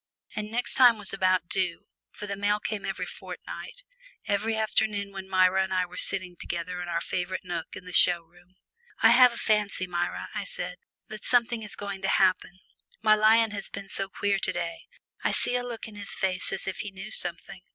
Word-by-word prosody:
And 210 0 -3
"next 240 +3 0
time" 245 -3 +7
was 205 -2 -2
about 185 -2 +2
due, 180 -3 -1 0.2
for 205 - -8
the 200 -1 -3
mail 205 +1 +1
came 210 -1 -4
every - - -3
fortnight, - - -8 0.4
one 210 +2 +1
afternoon 215 -2 0
when 190 -1 -8
Myra 185 0 +4
and 190 - -5
I 185 -1 +2
were 180 0 -13
sitting 185 -1 0
together 175 +1 -4
in 175 - -5
our 170 -1 -1
favourite 185 +2 -3
nook 175 -3 -5
in 185 - -10
the 180 - -9
show 175 0 +5
room. 175 +2 -24 0.5
"I - - +9
have 250 +1 +8
a 235 - -8
fancy, 210 -3 +1
Myra," 175 -1 -3
I - - -2
said, - - -5 0.3
"that 215 -1 -8
something 240 -2 +2
is 210 -1 -7
going 200 -1 -6
to 195 - -1
happen. 185 -1 +2 0.4
My 215 -1 +6
lion 220 +1 +5
has 200 -1 -5
been 200 0 -8
so 195 -1 -3
queer 200 0 0
to - - 0
day 170 0 -5 0.4
I - - +2
see 245 - +1
a 250 - +1
look 240 -3 -6
on 220 - -11
his 205 -1 -4
face 185 -1 -1
as - - -3
if 190 - -3
he 210 - -4
knew 195 +3 -9
something." 180 +1 -1
195 Hz, 210 wpm, -27 LUFS, 185-215 Hz, 0.5 s, I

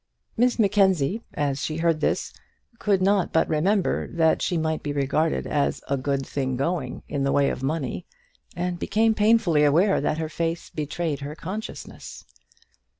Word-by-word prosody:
Miss 245 +2 +2
Mackenzie, 195 - +2
as 140 -1 -1
she 155 - -2
heard 165 -1 +1
this, - - 0 0.5
could 195 -3 +2
not 195 -2 +2
but 160 - +2
remember 180 +5 +1
that 160 -2 +2
she 175 - 0
might 160 -1 -1
be 145 - -3
regarded 145 +3 0
as 145 -1 -1
a 140 - +1
good 135 0 -1
thing 130 -2 -2
going 165 +6 -2
in 140 -2 -2
the 135 - +1
way 140 -1 +3
of - - -5
money, 135 - -3 0.5
and 175 0 -2
became 225 +1 +2
painfully 210 -8 +3
aware 170 +7 +3
that 150 - 0
her 160 -1 -2
face 165 +1 -3
betrayed 150 0 -3
her 145 +2 -6
consciousness. 205 +8 -7
160 Hz, 160 wpm, -25 LUFS, 145-190 Hz, 0.5 s, way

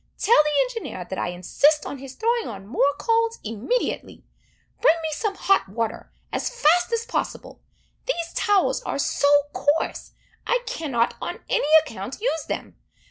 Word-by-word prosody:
Tell 460 -7 +5
the 300 +5 +2
engineer, 455 - -6
that 190 - -5
I - - -1
insist 280 - +2
on 280 - -6
his 265 0 -9
throwing 465 0 0
on 195 -3 -8
more 275 +6 +1
coals 460 0 +1
immediately. 225 - -2 0.6
Bring 465 - +6
me 320 - -1
some 400 +6 -2
hot 390 - +2
water, 225 +2 -4 0.2
as - - -1
fast 355 -4 +3
as 460 0 0
possible! - - -4 0.5
These 340 -9 -2
towels 405 -2 +2
are - - -3
so 285 0 +1 0.3
coarse, 295 +3 -1 0.3
I - - +1
cannot, 250 -7 -1
on - - -5
any - - +1 0.2
account, 225 0 -7
use 410 -9 -1
them. - - -5
310 Hz, 155 wpm, -24 LUFS, -, 0.6 s, Bring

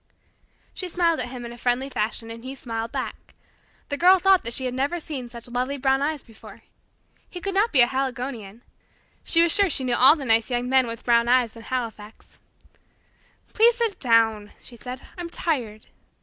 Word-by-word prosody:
She 370 - -5
smiled 335 -2 +1
at - - -1
him 245 -1 -8
in 235 - -8
a 240 - -13
friendly 245 +3 0
fashion, 225 -2 -3
and 230 0 -10
he 260 +1 -7
smiled 230 -3 -5
back. - - -6 0.5
The 285 - -2
Girl 365 +4 +6
thought 380 0 +4
that 235 - -2
she 260 - -2
had 250 - -2
never 280 +7 -1
seen 270 -6 -7
such 235 0 -10
lovely 250 +3 -2
brown 270 0 +1
eyes 295 0 -2
before. 225 -2 -15 0.7
He 355 - -8
could 395 +2 -4
not 415 +4 +2
be 265 - +6
a - - +8
Haligonian. 245 -4 -4 0.6
She 335 0 +3
was 340 - +3
sure 400 -2 +4
she 275 - +1
knew 250 -1 -1
all 260 +5 +7
the 285 -4 -7
nice 225 0 +2
young 245 0 -1
men 260 -1 +3
with 230 0 -7
brown 235 -1 +3
eyes 245 -2 +2
in 230 - -11
Halifax. 225 -3 -7 1.1
"Please 465 +1 +5
sit 460 -4 -1
down," 225 -4 +2
she 245 - -10
said 250 +2 -7
plaintively. - - -18
"I'm 340 - -6
tired." 240 -12 -3
255 Hz, 200 wpm, -24 LUFS, 235-305 Hz, 1.1 s, a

